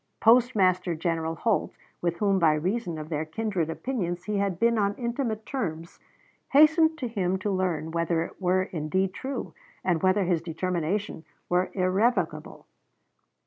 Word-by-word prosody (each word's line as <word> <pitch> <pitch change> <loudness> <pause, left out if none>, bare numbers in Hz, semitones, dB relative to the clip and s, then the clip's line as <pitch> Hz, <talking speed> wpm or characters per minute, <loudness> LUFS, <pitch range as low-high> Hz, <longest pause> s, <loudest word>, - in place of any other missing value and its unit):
Postmaster 200 -7 +4
General 165 0 -2
Holt, 215 +4 0 0.3
with 170 -1 -1
whom 200 -1 +2
by 160 -3 +4
reason 180 +2 -2
of 155 0 -7
their 155 -2 -1
kindred 175 0 -2
opinions 175 -3 -3
he 210 +1 -2
had 195 -4 -1
been 235 -1 +3
on 200 0 +1
intimate 235 -3 -3
terms, 170 - -4 0.5
hastened 315 +2 +5
to 255 - -3
him 190 -5 -1
to 200 +2 -2
learn 175 -5 -1
whether 170 0 0
it 170 - -11
were 185 +1 +2
indeed 185 +2 -1
true 265 +6 -5 0.3
and 175 -3 +1
whether 190 +2 +3
his 175 -3 +1
determination 175 +2 -2 0.3
were 180 +1 +2
irrevocable. 195 +6 0
185 Hz, 145 wpm, -27 LUFS, 170-220 Hz, 0.5 s, hastened